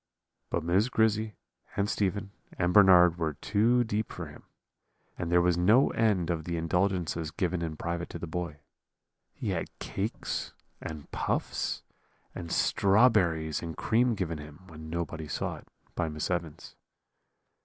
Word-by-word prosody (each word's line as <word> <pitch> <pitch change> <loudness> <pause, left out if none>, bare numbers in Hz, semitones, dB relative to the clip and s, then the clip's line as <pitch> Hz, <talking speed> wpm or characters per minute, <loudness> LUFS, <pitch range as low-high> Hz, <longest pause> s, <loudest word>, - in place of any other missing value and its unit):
"But 85 - -1
Miss 95 +8 +2
Grizzy, 110 -2 +1 0.4
and 100 0 +2
Stephen, 100 -1 -1 0.3
and 90 0 +1
Bernard 90 -3 +7
were 80 -3 -1
too 115 - +2
deep 110 -1 -2
for - - -6
him; - - -13 0.7
and 85 -1 -4
there 85 0 +5
was 90 -1 +2
no 110 +10 +5
end 100 -7 +2
of 80 -2 -3
the 85 -1 -2
indulgences 85 -1 0
given 85 +1 -1
in 80 -2 -3
private 85 +1 -3
to - - -6
the 85 - -5
boy. 85 -3 -5 0.7
He - - -5
had - - -2
cakes, 100 +4 -3 0.3
and 75 -2 -7
puffs, - - -2 0.5
and 85 -2 -7
strawberries 95 -7 +3
and 80 -2 -6
cream 120 +1 +2
given 85 -6 -3
him, 75 +3 -11
when 80 -3 -10
nobody 85 -1 -4
saw - - -3
it, - - -15 0.3
by 80 -2 -1
Miss 75 +3 -3
Evans. 85 -4 -4
90 Hz, 150 wpm, -29 LUFS, 80-100 Hz, 0.7 s, Bernard